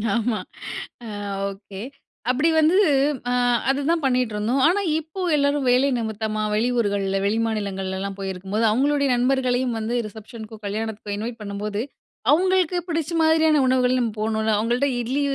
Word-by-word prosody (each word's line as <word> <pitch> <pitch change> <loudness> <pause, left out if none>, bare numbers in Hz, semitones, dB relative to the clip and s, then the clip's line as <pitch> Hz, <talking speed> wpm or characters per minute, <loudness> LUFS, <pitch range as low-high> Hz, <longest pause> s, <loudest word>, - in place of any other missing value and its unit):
ஆமா. 235 -1 0 0.7
ஆ. - - -7 0.4
ஓகே 195 0 -11 0.5
அப்டி 280 +6 +2
வந்து 315 +4 +4 0.5
ஆ - - +1 0.4
அதுதான் 285 +4 +1
பண்ணிட்டுருந்தோம். 250 -1 +1
ஆனா, 390 +4 +2 0.2
இப்போ 320 +5 -8
எல்லாரும் 285 -2 +1
வேலை 255 +3 +4
நிமித்தமா, 220 -1 -2
வெளி 225 +4 +1
ஊர்கள்ல, 200 -3 0
வெளிமாநிலங்கள்லலாம் 200 -3 -2
போயிருக்கும்போது 195 +3 -2
அவங்களுடைய 280 +5 +2
நண்பர்களையும் 250 -1 +1
வந்து 225 +2 -2
ரிசப்ஷனுக்கும், 220 0 -11
கல்யாணத்துக்கும் 210 0 -4
இன்வைட் 230 +2 -5
பண்ணும்போது. 205 +1 -3 0.5
அவங்களுக்கு 370 +1 +3
பிடிச்ச 325 -1 -1
மாரியான 315 -2 +4
உணவுகள் 255 0 +3
நம்ம 235 -2 0
போணுல. 220 0 0
அவங்கள்ட்ட 240 +6 +1
"இட்லி, 260 +5 -1
235 Hz, 125 wpm, -23 LUFS, 210-280 Hz, 0.7 s, வந்து